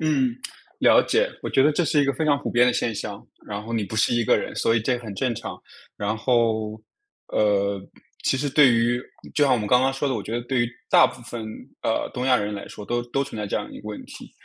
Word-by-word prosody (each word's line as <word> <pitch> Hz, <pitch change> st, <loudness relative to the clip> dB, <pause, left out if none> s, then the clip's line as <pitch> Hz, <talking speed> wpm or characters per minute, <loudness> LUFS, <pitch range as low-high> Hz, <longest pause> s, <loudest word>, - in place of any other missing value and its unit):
嗯， 135 Hz, -6 st, +1 dB, 0.4 s
了 -, -, +6 dB
解。 -, -, +2 dB
我 -, -, -3 dB
觉 135 Hz, -, +4 dB
得 150 Hz, +2 st, +4 dB
这 175 Hz, -, +1 dB
是 150 Hz, -1 st, +3 dB
一 145 Hz, -, +3 dB
个 140 Hz, -, +1 dB
非 155 Hz, +4 st, -2 dB
常 145 Hz, -2 st, +3 dB
普 -, -, -4 dB
遍 120 Hz, +1 st, +4 dB
的 125 Hz, -, +3 dB
现 115 Hz, -, -1 dB
象， 100 Hz, 0 st, -6 dB, 0.2 s
然 105 Hz, 0 st, -5 dB
后 115 Hz, +2 st, -7 dB
你 110 Hz, -3 st, 0 dB
不 110 Hz, +3 st, -6 dB
是 110 Hz, -, +3 dB
一 120 Hz, -1 st, +1 dB
个 -, -, +4 dB
人， -, -, -4 dB
所 115 Hz, -, +2 dB
以 115 Hz, -, +2 dB
这 125 Hz, +2 st, 0 dB
很 110 Hz, -4 st, -8 dB
正 125 Hz, +3 st, -1 dB
常。 -, -, -7 dB, 0.4 s
然 105 Hz, +2 st, -2 dB
后， 110 Hz, -2 st, +1 dB, 0.5 s
呃， 100 Hz, -2 st, +2 dB, 0.4 s
其 -, -, +2 dB
实 145 Hz, +2 st, -1 dB
对 135 Hz, -3 st, +6 dB
于 120 Hz, +1 st, +2 dB, 0.3 s
就 150 Hz, -, +4 dB
像 135 Hz, -, +3 dB
我 125 Hz, -, +3 dB
们 105 Hz, -, -3 dB
刚 125 Hz, +3 st, +4 dB
刚 135 Hz, 0 st, +2 dB
说 135 Hz, +1 st, -1 dB
的， 130 Hz, -, 0 dB
我 105 Hz, -, -3 dB
觉 110 Hz, -, -7 dB
得 120 Hz, -, -1 dB
对 125 Hz, 0 st, 0 dB
于 120 Hz, -, 0 dB, 0.2 s
大 -, -, +7 dB
部 130 Hz, -, -9 dB
分， 115 Hz, -1 st, -6 dB, 0.4 s
呃， -, -, 0 dB
东 125 Hz, -, -2 dB
亚 130 Hz, -1 st, +5 dB
人 105 Hz, -1 st, -2 dB
来 100 Hz, -, -7 dB
说， 105 Hz, -, -9 dB
都 120 Hz, +2 st, -1 dB
都 140 Hz, +2 st, 0 dB
存 130 Hz, -, -9 dB
在 105 Hz, -, -3 dB
这 -, -, -1 dB
样 -, -, -4 dB
一 -, -, -9 dB
个 105 Hz, -, -9 dB
问 105 Hz, -, -6 dB
题。 -, -, -11 dB
120 Hz, 290 characters per minute, -24 LUFS, 110-130 Hz, 0.5 s, 大